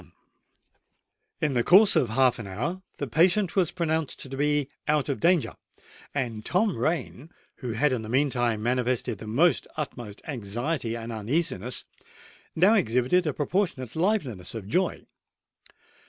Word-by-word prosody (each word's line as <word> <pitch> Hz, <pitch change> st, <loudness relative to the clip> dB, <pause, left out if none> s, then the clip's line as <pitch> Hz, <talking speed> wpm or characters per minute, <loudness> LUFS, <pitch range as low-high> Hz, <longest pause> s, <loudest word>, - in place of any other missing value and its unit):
In 150 Hz, -2 st, +1 dB
the 120 Hz, -2 st, +2 dB
course 195 Hz, -, +6 dB
of 120 Hz, -, +3 dB
half 125 Hz, +2 st, +3 dB
an 110 Hz, -, -6 dB
hour 145 Hz, -, -3 dB, 0.2 s
the -, -, -2 dB
patient 185 Hz, +3 st, +2 dB
was 185 Hz, -5 st, +3 dB
pronounced 160 Hz, -4 st, -1 dB
to 135 Hz, 0 st, -7 dB
be 145 Hz, 0 st, +1 dB, 0.2 s
out 150 Hz, -1 st, +1 dB
of 140 Hz, -, -1 dB
danger; 170 Hz, -2 st, +2 dB, 0.6 s
and 120 Hz, -6 st, -3 dB
Tom 185 Hz, -, +1 dB
Rain, 145 Hz, +2 st, -2 dB, 0.3 s
who 125 Hz, -4 st, -4 dB
had 135 Hz, +5 st, +2 dB
in 120 Hz, -, -1 dB
the 110 Hz, -, -8 dB
meantime 120 Hz, -4 st, +1 dB
manifested 125 Hz, -2 st, 0 dB
the 120 Hz, +12 st, +2 dB
utmost 120 Hz, -8 st, -6 dB
anxiety 120 Hz, 0 st, -3 dB
and 115 Hz, 0 st, -6 dB
uneasiness, 120 Hz, -, -1 dB, 0.7 s
now 185 Hz, +7 st, +5 dB
exhibited 160 Hz, -, +2 dB
a -, -, +2 dB
proportionate 150 Hz, -, -1 dB
liveliness 155 Hz, -, -1 dB
of 105 Hz, -4 st, -6 dB
joy. 180 Hz, -, 0 dB
135 Hz, 140 wpm, -26 LUFS, 115-165 Hz, 0.7 s, course